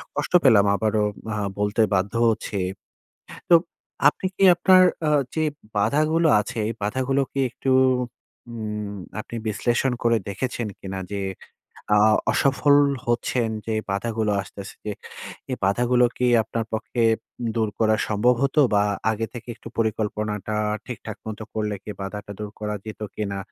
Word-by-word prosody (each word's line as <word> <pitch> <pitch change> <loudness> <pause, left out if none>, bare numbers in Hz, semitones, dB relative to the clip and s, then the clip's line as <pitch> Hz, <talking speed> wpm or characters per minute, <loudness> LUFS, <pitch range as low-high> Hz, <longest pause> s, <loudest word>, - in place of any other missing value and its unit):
কষ্ট - - -3
পেলাম 110 -6 +6
আবারও 110 0 +1 0.3
আ - - -2 0.2
বলতে 105 +2 +1
বাধ্য 95 +2 0 0.2
হচ্ছি। 110 -1 -2 0.9
তো, - - +6 0.5
আপনি 150 - 0
কি 195 - 0
আপনার 185 +1 +6 0.2
আ - - +3 0.3
যে 160 - +1 0.3
বাধাগুলো 155 +8 +2
আছে, 105 - -5
এই 115 - -2
বাধাগুলো 130 +5 0
কি 135 - -3
একটু 135 - -4 0.8
উম 105 -2 -4 0.3
আপনি 110 - -7
বিশ্লেষণ 120 +4 +1
করে 115 -1 +4
দেখেছেন 120 +2 -3
কিনা 95 0 -5
যে 100 - -2 0.7
অ - - +6 0.3
অসফল 140 +3 +3 0.3
হচ্ছেন, 120 0 0 0.2
যে 110 - -2 0.2
বাধাগুলো 110 +1 -1
আসতেছে, 95 0 -10 0.8
এই 130 - -1
বাধাগুলো 120 +5 +3
কি 125 - +1 0.2
আপনার 115 +1 -3
পক্ষে 115 +2 -2 0.5
দূর 110 -2 +1
করা 110 -1 +3
সম্ভব 115 +4 +3
হতো, 140 +2 +3
বা 100 - +4 0.3
আগে 110 +1 -2
থেকে 120 0 -9
একটু 115 - -11
পরিকল্পনাটা 110 -1 -1 0.3
ঠিকঠাক 110 -3 -7
মতো 110 0 -5
করলে 105 -1 -1
কি 105 - -6
বাধাটা 100 +1 -6
দূর 105 - -5
করা 105 0 -2
যেত 110 0 -8
কিনা? 100 -2 -3
110 Hz, 140 wpm, -24 LUFS, 105-125 Hz, 0.9 s, পেলাম